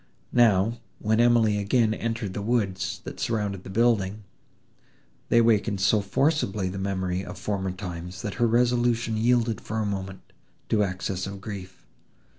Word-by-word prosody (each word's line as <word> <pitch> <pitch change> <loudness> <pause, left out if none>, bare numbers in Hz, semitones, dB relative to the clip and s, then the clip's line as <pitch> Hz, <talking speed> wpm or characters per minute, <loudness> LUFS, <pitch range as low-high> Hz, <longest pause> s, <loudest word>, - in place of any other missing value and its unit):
Now, 115 -1 +4 0.2
when 110 +1 +1
Emily 115 -3 +4
again 110 +2 +2
entered 115 -3 -3
the 105 - -4
woods, 100 -4 -1
that - - -8
surrounded 105 -4 -2
the - - -9
building, 105 -1 +1 1.1
they - - +4
awakened 110 -3 +3
so 100 +2 +3
forcibly 105 - 0
the 95 +1 -5
memory 95 -1 -2
of - - -8
former 95 0 -2
times, 90 0 -7
that 105 -4 -3
her 120 - +5
resolution 120 -1 +2
yielded 115 0 +2
for 110 - -5
a 110 - 0
moment 95 -1 -4 0.5
to 110 - +3
excess 95 0 -3
of 100 0 -7
grief. 95 -2 -8
105 Hz, 150 wpm, -26 LUFS, 95-115 Hz, 1.1 s, her